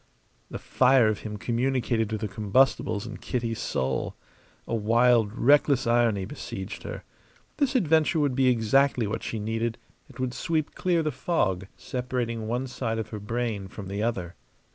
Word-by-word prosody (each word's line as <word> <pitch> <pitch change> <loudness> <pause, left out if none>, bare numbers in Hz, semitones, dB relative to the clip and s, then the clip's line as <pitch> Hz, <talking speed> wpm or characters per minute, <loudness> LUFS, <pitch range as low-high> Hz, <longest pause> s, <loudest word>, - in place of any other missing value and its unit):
The - - -5
fire 130 -3 +4
of 105 - -1
him 105 -1 -6
communicated 120 -1 0
to 110 - -2
the 110 0 -3
combustibles 105 0 +1
in - - -7
Kitty's 115 -2 -3
soul. 65 0 -2 0.5
A - - -3
wild, 115 0 +3
reckless 140 +2 +3
irony 115 -4 +2
besieged 100 -5 -7
her. - - -7 0.5
This 280 -3 +1
adventure 160 - +3
would 145 -3 +2
be 130 0 +2
exactly 125 +2 +3
what 105 +2 -3
she 115 - -4
needed; 115 +2 -2 0.3
it - - -15
would 130 -1 -1
sweep 155 0 -1
clear 175 -3 +1
the 155 - 0
fog 100 - -1
separating 120 -3 -3
one 120 +3 -1
side 125 -3 -3
of 110 - -4
her 105 - -6
brain 110 -2 -3
from 95 -1 -8
the 100 +1 -3
other. 95 -7 -2
115 Hz, 165 wpm, -26 LUFS, 105-130 Hz, 0.5 s, fire